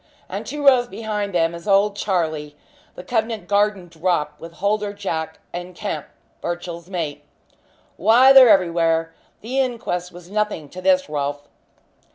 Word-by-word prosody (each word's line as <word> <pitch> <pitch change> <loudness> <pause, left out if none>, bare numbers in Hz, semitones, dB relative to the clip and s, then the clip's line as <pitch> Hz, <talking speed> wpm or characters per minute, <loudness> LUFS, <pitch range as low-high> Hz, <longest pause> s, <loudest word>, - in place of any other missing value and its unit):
And - - -6
two 295 -1 -4
rows 255 -3 +6
behind 210 -2 -4
them 165 -2 +1
is 170 +4 -9
old 200 +1 +3
Charlie, 160 -7 -2 0.4
the 180 - -9
Covent 225 -1 -2
Garden 205 -2 +1
'drop,' 165 -3 -1
with 165 0 -10
Holder 205 +3 -1
Jack 160 -6 -4 0.2
and 180 +1 -6
Kemp, - - -4 0.3
Birchill's 175 0 -5
mate. 165 -6 -4 0.7
Why, 240 +8 +6
they're 260 -3 +9
everywhere. 165 -3 +2 0.3
The 255 +5 -2
inquest 230 -9 -2
was 175 +1 -13
nothing 210 -8 -2
to 185 - -9
this, 185 0 +3
Rolfe." 145 -1 -3
185 Hz, 145 wpm, -21 LUFS, 165-210 Hz, 0.7 s, they're